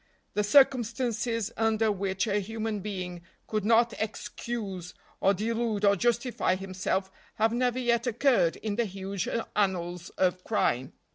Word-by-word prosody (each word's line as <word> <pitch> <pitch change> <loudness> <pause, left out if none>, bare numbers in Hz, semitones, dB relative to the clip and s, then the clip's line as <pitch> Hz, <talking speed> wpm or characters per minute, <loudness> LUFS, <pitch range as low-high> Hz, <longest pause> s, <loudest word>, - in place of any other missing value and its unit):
The 210 - +1
circumstances 235 -2 +2
under 225 -1 +2
which 195 0 -1
a 210 -2 +1
human 220 +1 -3
being 180 -3 -5 0.2
could 215 -2 -2
not 230 +2 +4
excuse 210 -4 -4 0.2
or 195 +1 +3
delude 220 0 0
or 200 0 +5
justify 235 -2 +1
himself 190 0 -2 0.2
have 220 +1 +2
never 245 0 +1
yet 240 -1 +1
occurred 240 - +3
in 215 -1 -4
the 235 - +2
huge 195 -1 -4 0.3
annals 180 -4 -1
of 185 -1 +1
crime. 130 - 0
210 Hz, 135 wpm, -28 LUFS, 190-230 Hz, 0.3 s, or